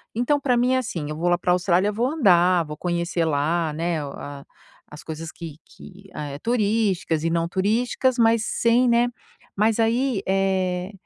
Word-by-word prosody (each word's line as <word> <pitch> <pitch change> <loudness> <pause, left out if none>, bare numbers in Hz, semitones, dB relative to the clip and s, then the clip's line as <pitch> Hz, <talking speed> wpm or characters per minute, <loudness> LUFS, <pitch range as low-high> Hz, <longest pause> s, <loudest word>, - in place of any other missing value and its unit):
então 245 +5 +1
pra 250 -3 +1
mim 250 +2 +2
é - - +3
assim, 175 -12 -4
eu 155 - -4
vou 175 +2 0
lá 175 - +3
pra 180 0 +1
Austrália, 180 +2 +2
vou 230 +4 -1
andar, 180 - +3
vou 150 0 -7
conhecer 175 -1 -1
lá, 160 +2 0
né, 165 0 -2
a 140 0 -8 0.5
as 150 - -10
coisas 160 0 -6
que 165 -4 -9
que 195 +1 -15
eh, 145 -2 -6
turísticas 205 -7 0
e 165 - +1
não 165 0 0
turísticas, 235 +7 0
mas 225 -1 +3
sem 240 +2 +2
né, 235 +1 +3 0.5
mas, 215 +2 +1
aí, 230 0 +1
eh, 190 -1 0
185 Hz, 175 wpm, -23 LUFS, 165-230 Hz, 0.5 s, é